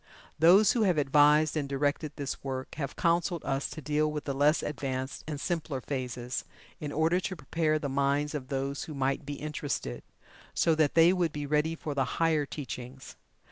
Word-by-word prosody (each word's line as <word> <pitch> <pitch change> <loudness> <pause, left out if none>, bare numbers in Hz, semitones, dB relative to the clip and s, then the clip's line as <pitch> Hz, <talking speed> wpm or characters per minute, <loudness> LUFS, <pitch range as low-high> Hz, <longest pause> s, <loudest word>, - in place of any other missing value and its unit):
Those 185 +6 +7
who 240 - +1
have 185 -6 +3
advised 150 +2 +4
and 145 -3 -2
directed 145 +2 -1
this 140 -2 -5
work 130 -1 -4
have 140 -2 -4
counseled 170 0 +1
us 135 +1 -1
to 155 - -8
deal 150 +1 +1
with 150 -1 -4
the 140 - -2
less 145 +3 +3
advanced 130 -2 -4
and 150 -2 -4
simpler 155 -4 -2
phases, 125 -2 -4 0.4
in 150 -1 -4
order 160 +4 +2
to 185 0 -4
prepare 155 +1 0
the 150 - -3
minds 140 +2 0
of 140 -4 -4
those 135 +1 -3
who 155 - -7
might 135 +1 -1
be 145 - -3
interested, 145 - -4 0.5
so 165 - +3
that 155 -2 +2
they 165 +2 +7
would 175 -4 +1
be 150 -1 -4
ready 150 +3 +1
for 155 -2 -5
the 135 -2 +1
higher 160 -3 +2
teachings. 130 -2 -7
150 Hz, 185 wpm, -29 LUFS, 135-160 Hz, 0.5 s, Those